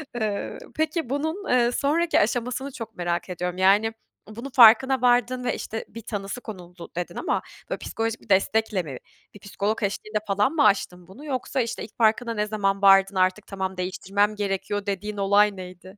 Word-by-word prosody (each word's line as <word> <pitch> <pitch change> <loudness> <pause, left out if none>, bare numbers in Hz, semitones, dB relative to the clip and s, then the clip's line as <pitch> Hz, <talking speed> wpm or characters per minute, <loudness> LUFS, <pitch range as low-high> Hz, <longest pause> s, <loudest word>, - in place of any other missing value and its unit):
Eee, 215 -4 -3 0.2
peki 315 -3 -1
bunun, 315 +8 -3
eee, 240 -1 +3
sonraki 320 +6 +1
aşamasını 250 +5 -1
çok 225 -3 -8
merak 175 0 -2
ediyorum. 180 0 -4
Yani, 205 +4 +3 0.3
bunun 235 +6 -8
farkına 250 +1 +6
vardın 250 0 +2
ve, 245 - -1
işte, 225 - -5
bir 230 - -10
tanısı 205 0 -5
konuldu 180 -6 -10
dedin 175 0 -4
ama - - -1 0.3
böyle - - -2
psikolojik 225 0 -3
bir - - -21
destekle 200 0 +2
mi? 140 -5 -7 0.4
Bir 205 - -13
psikolog 205 +3 -3
eşliğinde 215 +2 -2
falan 205 +5 +2
mı 320 - +3
aştın 180 -3 +1
bunu 240 +11 -13
yoksa 260 -2 -2
işte 230 - -4
ilk 210 - -12
farkına 230 +1 +2
ne 210 -1 -1
zaman 200 -2 -1
vardın 195 0 +6
artık 185 +2 +1
tamam 190 -1 -4
değiştirmem 195 +3 -1
gerekiyor 205 0 -2
dediğin 205 +1 -4
olay 200 +1 +3
neydi? 185 +1 -11
210 Hz, 175 wpm, -24 LUFS, 195-240 Hz, 0.4 s, farkına